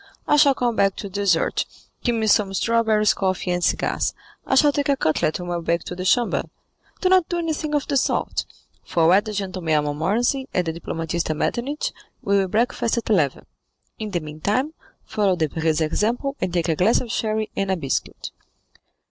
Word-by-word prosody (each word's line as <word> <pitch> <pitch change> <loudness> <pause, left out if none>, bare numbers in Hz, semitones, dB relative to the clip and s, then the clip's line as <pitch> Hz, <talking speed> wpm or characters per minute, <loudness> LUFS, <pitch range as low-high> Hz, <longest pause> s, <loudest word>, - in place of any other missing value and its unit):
I - - +4
shall 285 -2 +5
come 240 -2 0
back 195 -2 +2
to 200 - -6
dessert; 195 -3 +1 0.4
keep 240 -2 +1
me 220 -1 0
some 200 -2 +3
strawberries, 220 -1 +3
coffee, 185 -1 -1
and 175 0 -1
cigars. - - 0 0.3
I - - +2
shall 290 +2 +6
take 285 0 -1
a 280 - +3
cutlet 155 -4 0
on 180 - -5
my 175 0 -2
way 170 0 +1
to 175 - -8
the 185 +1 -5
Chamber." 240 +5 +2 0.6
"Do 370 - +3
not 370 -3 +4
do 345 - -1
anything 315 -2 -2
of 290 - 0
the 280 - +1
sort; - - 0 0.4
for 165 -2 +1
were 185 +4 +6
the 215 - -6
gentleman 185 -5 -2
a 150 - +2
Montmorency, 210 - 0
and 180 - +2
the 160 - -2
diplomatist 165 0 -3
a 155 - 0
Metternich, 265 - -2 0.3
we 200 - +2
will 190 - +1
breakfast 230 +3 0
at 225 -1 -2
eleven; 150 -10 +1 0.5
in 215 -1 -4
the 175 -4 -2
meantime, 200 - -2 0.3
follow 200 -3 +1
Debray's 160 -1 0
example, 230 - 0
and 180 - -1
take 175 -1 0
a 160 - +2
glass 190 +8 +3
of 235 - -5
sherry 215 -1 -1
and 195 -1 -1
a 190 - +1
biscuit." 140 -5 -3
200 Hz, 195 wpm, -22 LUFS, 170-240 Hz, 0.6 s, shall